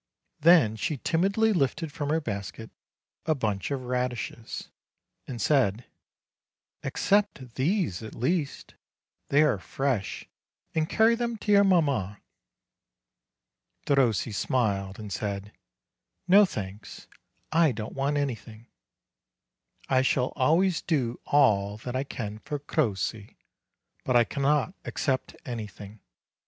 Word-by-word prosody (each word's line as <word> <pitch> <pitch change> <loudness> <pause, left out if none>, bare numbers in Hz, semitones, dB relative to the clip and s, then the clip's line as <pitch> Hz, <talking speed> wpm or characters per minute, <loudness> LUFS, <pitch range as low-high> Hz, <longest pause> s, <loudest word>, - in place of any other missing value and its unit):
Then 155 -10 +5
she 150 +6 -2
timidly 200 - +2
lifted 155 -1 0
from 145 -2 -4
her 160 +2 +2
basket 110 - -6 0.6
a 155 - +3
bunch 105 -8 -2
of 135 -3 -3
radishes, 125 -2 -4 0.6
and 125 -3 -6
said: 120 -3 +2 1.0
"A'ccept 195 - 0
these 150 - 0
at 110 - -8
least, 140 +4 -2 0.6
they 145 +2 +5
are 130 -10 +2
fresh, 125 -2 -2 0.5
and 160 -1 0
carry 225 +1 +4
them 235 -1 -2
to 210 - -2
your 200 0 +7
mamma." 140 - +2 1.7
Derossi 125 -6 +2
smiled, 100 -4 0
and 105 -3 -6
said: 100 -1 -4 0.8
"No, 200 +3 +7
thanks: 100 - -7 0.5
I 160 -2 +4
don't 110 -2 -6
want 140 +2 0
anything; 115 -5 -4 1.2
I 130 -1 +3
shall 130 -1 +1
always 165 +6 +3
do 125 -7 -1
all 105 -8 +3
that 125 +3 -6
I 130 +2 -1
can 105 -5 -5
for 145 +5 -4
Crossi, 110 -7 -2 0.7
but 125 - 0
I 120 - +7
cannot 145 +6 0
accept 130 -3 -2
anything. 105 -3 -7
130 Hz, 115 wpm, -27 LUFS, 110-155 Hz, 1.7 s, your